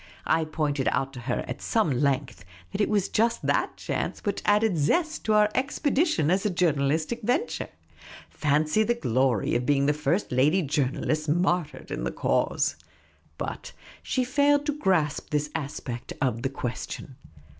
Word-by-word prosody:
I 160 0 +2
pointed 150 -3 -1
out 135 0 0
to 125 - -8
her 120 +1 -2
at - - -6
some 220 -9 +1
length 130 -5 0 0.3
that 210 - -2
it - - +2
was 205 -3 +1
just 230 +2 +1
that - - 0
chance - - -3
which 200 -1 -1
added 210 -1 +3
zest 310 - +1
to 220 - +2
our 210 0 +4
expedition 275 - +1
as 190 +1 +2
a 210 - +1
journalistic 160 +1 +1
venture; 255 - -1 0.6
fancy 155 +6 +1
the 235 +2 +2
glory 130 - +1
of 120 +1 0
being 140 -1 +3
the 145 - +3
first 150 +6 -1
lady 150 +9 +3
journalists 150 +2 -1
martyred 175 0 0
in - - -3
the - - 0
cause! - - 0 0.6
But - - -5 0.3
she 255 - 0
failed 285 +3 +3
to 295 0 -2
grasp 175 - +1
this 150 0 -1
aspect 135 -4 -5
of 125 -4 0
the 135 - -1
question. 130 +1 -5
155 Hz, 160 wpm, -26 LUFS, 140-210 Hz, 0.6 s, our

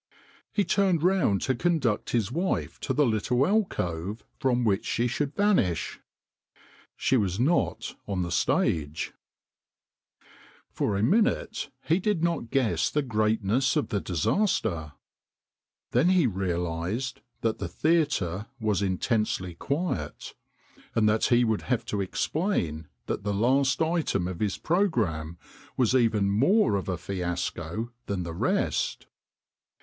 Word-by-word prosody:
He 205 - +1
turned 185 -6 +2
round 180 - +2
to 130 - +1
conduct 130 -5 0
his 115 -3 0
wife 175 +7 -1
to - - -3
the 150 - +3
little 120 +3 +1
alcove 105 - -1 0.2
from 125 -3 +1
which 105 -3 +2
she 120 - 0
should 140 +4 -2
vanish. 185 - +1 1.0
She 130 - +2
was 100 -3 0
not 150 +8 +1
on 95 -3 -1
the 85 - -4
stage! 75 -2 0 1.6
For 100 - -1
a 100 - 0
minute 220 - +1
he 165 +3 +2
did 190 -4 0
not 165 -9 0
guess 130 -4 +1
the 150 - 0
greatness 110 +3 +1
of 150 - 0
the 100 - -1
disaster. 90 - 0 1.0
Then 130 +9 +3
he 185 -5 +4
realised 90 +3 -2 0.2
that 115 -1 0
the - - -3
theatre 145 - +1
was 105 -4 0
intensely 100 -1 0
quiet, 140 - -3 0.6
and 110 -2 +3
that 105 +1 +2
he 120 0 +4
would 110 -3 +1
have 125 -3 +1
to 100 - -2
explain 95 - -1 0.2
that - - -3
the 100 0 -1
last 130 +5 +2
item 160 - 0
of 90 -2 -5
his 105 -2 -1
pro 185 +5 +2
gramme 85 - -2 0.4
was 125 -2 +3
even 110 -5 +3
more 140 - +3
of 95 -1 -2
a 90 - -1
fiasco 90 +3 -3 0.2
than 95 -3 -2
the 85 -1 -5
rest. 85 - 0
110 Hz, 135 wpm, -27 LUFS, 95-150 Hz, 1.6 s, he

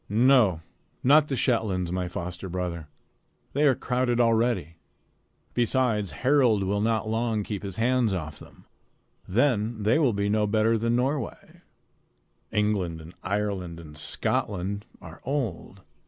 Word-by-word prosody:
"No, 110 -6 +4 0.4
not 150 +3 +6
the 135 - -2
Shetlands, 105 -9 0
my 90 0 -1
foster 90 +1 -6
brother. 85 -3 -4 0.7
They 145 +2 +3
are 135 - +4
crowded 125 0 0
already. 115 -8 +1 0.8
Besides, 120 -4 +1 0.2
Harald 125 -7 +4
will 100 +2 0
not 110 0 0
long 110 -1 0
keep 100 -1 -4
his 100 -3 -6
hands 120 0 +2
off 80 -5 -4
them. - - -16 0.6
Then 110 0 +1
they 110 +8 +3
will 135 -7 +3
be 100 0 0
no 105 0 +2
better 110 +2 +2
than 115 +1 +1
Norway. 135 +4 -3 0.9
England 100 -6 0
and 80 +2 -12
Ireland 95 -4 -2
and 75 -2 -11
Scotland 100 +5 -2 0.2
are 80 +1 -11
old. 130 - -3
105 Hz, 135 wpm, -26 LUFS, 90-120 Hz, 0.9 s, not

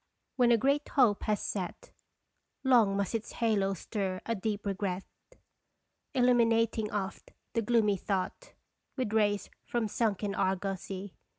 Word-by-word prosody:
When 245 -2 +4
a 235 - +6
great 280 +5 +1
hope 240 -8 +4
has 210 -1 +1
set 185 -4 -4 0.7
Long 230 -7 +4
must 200 +1 -1
its 220 -2 -3
halo 205 -4 +1
stir 190 0 -3
a 230 - 0
deep 210 0 -3
regret, 195 -1 -2 1.1
Illuminating 230 -3 +3
oft 195 -3 -4 0.2
the 230 - +1
gloomy 210 -3 +3
thought 195 - -3 0.4
With 250 -5 -1
rays 205 -2 +1
from 235 -2 -1
sunken 205 -2 0
argosy. 190 0 -2
210 Hz, 125 wpm, -31 LUFS, 195-230 Hz, 1.1 s, a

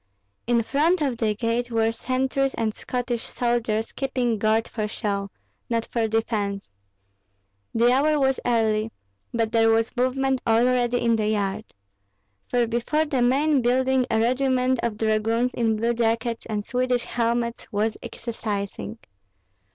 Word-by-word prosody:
In 235 -1 +3
front 310 +9 +2
of 265 -5 0
the 215 -2 0
gate 235 +2 -1
were 225 -1 +1
sentries 265 +3 -1
and 220 -2 -1
Scottish 245 -1 -4
soldiers 230 -2 -1
keeping 250 -4 -1
guard 220 +2 +2
for 215 -2 -3
show, 200 -2 -3 0.4
not 230 -1 0
for 230 -2 +1
defence. 210 - -2 1.0
The 235 +2 +4
hour 300 +3 +3
was 265 -1 +2
early, 220 -2 +1 0.4
but 225 -2 0
there 225 -1 +4
was 225 +2 +1
movement 260 +1 +1
already 245 +1 +3
in 230 -1 +2
the 215 -1 0
yard; 210 0 -1 0.8
for 245 -1 +2
before 240 +7 0
the 275 -5 -1
main 275 +3 +3
building 255 +1 +2
a 225 - +2
regiment 255 +1 +2
of 225 -3 -2
dragoons 225 +3 +1
in 225 -2 +1
blue 230 +2 0
jackets 230 0 -1
and 210 -2 -3
Swedish 250 -1 0
helmets 235 0 -1
was 215 +1 0
exercising. 205 - -5
235 Hz, 140 wpm, -24 LUFS, 220-250 Hz, 1.0 s, The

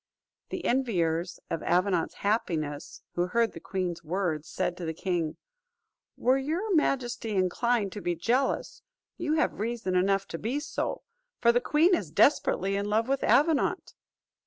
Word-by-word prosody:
The - - -5
enviers 180 -9 0
of 165 - -1
Avenant's 180 -1 +1
happiness, 160 -9 -2
who 175 +1 0
heard 230 +4 +1
the - - -9
queen's 180 -3 -3
words, 165 -3 -2
said 185 -1 -1
to 175 - -5
the 160 0 -3
king, 170 -3 -2 0.8
"Were 260 +2 +3
your 340 +10 -1
majesty 240 - 0
inclined 200 +3 +1
to 205 - -7
be 175 -2 -1
jealous, 240 +11 0 0.4
you 330 -3 -1
have 315 -9 +1
reason 225 -3 -2
enough 195 +2 +2
to 165 - -5
be 250 +6 -1
so, 295 - -3 0.4
for 235 - +5
the 245 +1 +2
queen 320 +8 +3
is 195 - 0
desperately 195 - +3
in 200 +1 -1
love 220 +2 +2
with 275 0 0
Avenant." 305 +1 +2
205 Hz, 155 wpm, -28 LUFS, 175-255 Hz, 0.8 s, for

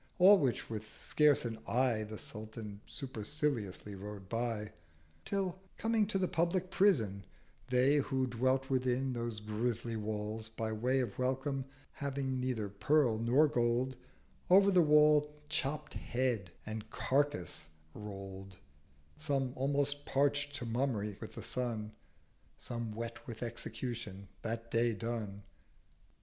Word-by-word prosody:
All 195 +2 +8
which 130 -5 0
with 110 -1 -6
scarce 150 -4 +3
an 115 -1 -3
Eye 125 -3 +2
The 110 0 -7
Sultan 105 -1 -7
superciliously 120 -5 -2
rode 100 0 -8
by: 115 -2 -1 0.5
Till 190 -2 -1 0.2
coming 225 -2 +2
to 200 - 0
the 185 -1 +1
public 175 +3 0
Prison, 115 - +3 0.5
They 130 +3 +4
Who 135 -2 +1
dwelt 130 +2 +1
within 130 0 +1
those 115 -2 -3
grisly 115 +2 -2
Walls, 110 +1 -3
by 110 0 -3
way 125 +5 +1
Of 125 - -4
Welcome, 135 +1 0 0.3
having 135 -2 -2
neither 125 -5 -1
Pearl 120 +3 +2
nor 125 +7 +5
Gold, 125 0 +1 0.5
Over 195 +2 +7
the 185 -2 +6
wall 150 -1 +6 0.2
chopt 150 -1 -2
Head 120 -7 -1 0.2
and 110 0 -5
Carcase 135 - 0 0.2
roll'd, 95 -2 -8 0.6
Some 135 -4 0
almost 145 +1 +1
parcht 145 +1 +1
to 135 -4 -4
Mummy 115 -4 0
with - - -7
the - - -7
Sun, 115 -4 -2 0.7
Some 115 -2 -4
wet 115 +1 -6
with 115 -1 -5
Execution 115 -4 -5
that 115 +1 -4
day 115 0 +3
done. 105 -2 -4
120 Hz, 130 wpm, -34 LUFS, 110-140 Hz, 0.7 s, All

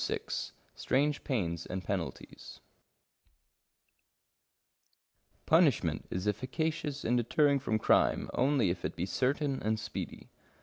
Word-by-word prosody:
88 - - -3 0.2
STRANGE 145 +2 0
PAINS 85 - -2
AND 95 0 -4
PENALTIES - - -5 2.9
Punishment - - +3
is 90 +3 -3
efficacious 145 - -2
in 120 - +2
deterring 140 +4 +3
from 110 -4 0
crime - - +3
only 130 -7 +2
if 85 0 -5
it 75 - -3
be 85 - -2
certain 135 - 0
and 110 +1 0
speedy. 105 -1 -6
120 Hz, 105 wpm, -31 LUFS, 100-145 Hz, 2.9 s, Punishment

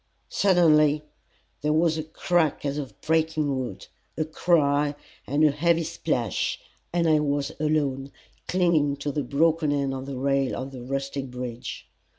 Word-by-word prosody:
Suddenly 155 -6 +4 0.6
there 150 +1 +1
was 160 0 +3
a 155 - -3
crack 160 -1 0
as 140 +1 -1
of 140 -3 -8
breaking 155 -3 +1
wood, 120 -7 -5 0.3
a 155 - 0
cry 150 -3 +2 0.3
and 145 +3 +2
a 155 - +6
heavy 165 +3 +2
splash, 155 - -1 0.3
and 170 -1 +1
I 155 -1 +4
was 145 -1 -1
alone, 140 -3 0 0.4
clinging 170 -6 +2
to 140 +1 -3
the 145 - -1
broken 155 +3 +2
end 140 -2 0
of 135 0 -5
the 135 -2 -5
rail 135 0 +1
of 130 +1 -5
the 130 -2 -8
rustic 135 +1 -3
bridge. 125 -1 -6
145 Hz, 155 wpm, -25 LUFS, 135-160 Hz, 0.6 s, a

